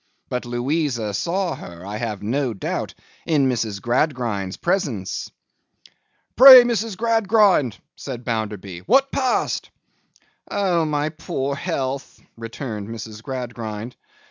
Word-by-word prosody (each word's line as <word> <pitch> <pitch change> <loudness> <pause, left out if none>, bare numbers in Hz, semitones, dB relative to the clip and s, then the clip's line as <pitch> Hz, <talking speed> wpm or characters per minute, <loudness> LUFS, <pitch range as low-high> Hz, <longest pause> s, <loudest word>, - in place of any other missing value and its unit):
But 125 0 -3
Louisa 120 -2 -1
saw 175 - -1
her, 85 +1 -10
I 105 +2 -5
have 105 -3 -4
no 125 +1 -1
doubt, 95 - -4 0.3
in 145 -5 +3
Mrs. 110 -5 -1
Gradgrind's 120 -6 -1
presence.' 140 - -2 1.1
'Pray, 255 0 +11
Mrs. 225 -4 -1
Gradgrind,' 210 - +3 0.2
said 125 -3 -7
Bounderby, 105 -6 -3
'what 275 0 +4
passed?' 260 -2 0 0.8
'Oh, 180 -5 +1
my 150 0 0
poor 150 -4 -3
health!' 140 -3 -4 0.2
returned 115 -2 -6
Mrs. 110 -1 -8
Gradgrind. 120 -3 -6
130 Hz, 110 wpm, -22 LUFS, 110-170 Hz, 1.1 s, Pray